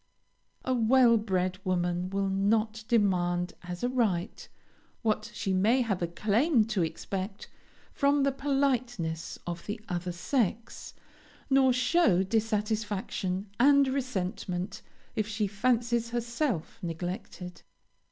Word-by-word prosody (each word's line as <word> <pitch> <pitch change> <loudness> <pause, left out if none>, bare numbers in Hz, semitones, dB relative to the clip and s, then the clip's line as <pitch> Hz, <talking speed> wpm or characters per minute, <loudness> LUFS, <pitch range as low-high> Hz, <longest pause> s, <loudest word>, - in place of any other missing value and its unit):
A 255 - +1
well 240 0 +5
bred 185 -4 0
woman 175 0 0
will 195 0 -1
not 215 +3 +1
demand 180 -6 +1
as 175 +2 -7
a - - +3
right 215 -8 -1 0.5
what 215 0 0
she 200 -2 -2
may 220 +8 +3
have 205 -7 -1
a 170 - +1
claim 220 - +2
to 195 - +1
expect 190 +4 -4 0.5
from 280 0 +3
the 275 - +3
politeness 255 - -1
of 170 -1 -5
the 210 +2 -3
other 180 -1 -3
sex, 220 +4 -2 0.6
nor 265 -1 +5
show 250 - +3
dissatisfaction 210 -2 -1
and 280 +2 +6
resentment 200 -6 -3 0.3
if 215 -1 0
she 215 -1 -1
fancies 235 +3 +1
herself 235 - -2
neglected. 180 +1 -6
210 Hz, 115 wpm, -29 LUFS, 185-240 Hz, 0.6 s, and